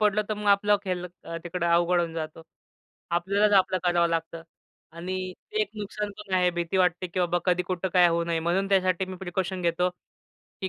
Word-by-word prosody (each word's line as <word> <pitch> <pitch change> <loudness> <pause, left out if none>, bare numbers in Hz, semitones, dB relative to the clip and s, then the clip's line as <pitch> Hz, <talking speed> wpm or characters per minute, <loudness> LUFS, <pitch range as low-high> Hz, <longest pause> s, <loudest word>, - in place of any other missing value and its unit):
पडलो, 210 0 +3
तर 215 - 0
मग 210 0 -6
आपलं 205 +1 +4 0.7
तिकडं 175 0 -2
अवघड 175 +1 +3
होऊन 170 -1 -2
जातं. 160 0 -5 0.7
आपल्यालाच 200 +4 +2
आपलं 185 0 +1
करावं 175 -1 +3
लागतं. 165 0 -3 0.5
आणि 185 +2 -4 0.2
ते 430 - +1
एक - - -5
नुकसान 210 0 -4
पण 200 -3 -4
आहे. 180 -1 +3
भीती 175 +1 -2
वाटते, 180 0 +2
"की 180 +2 -2
बाबा 175 0 +1
कधी 180 -1 +2
कुठं 185 +1 -2
काय 180 -1 +6
होऊ 170 0 +1
नये," 165 -1 -1
म्हणून 185 +4 0
त्यासाठी 185 -1 +2
मी 185 0 -7
प्रिकॉशन 185 0 -3
घेतो, 175 +1 +2 0.7
की 190 - -2
180 Hz, 185 wpm, -26 LUFS, 170-190 Hz, 0.7 s, काय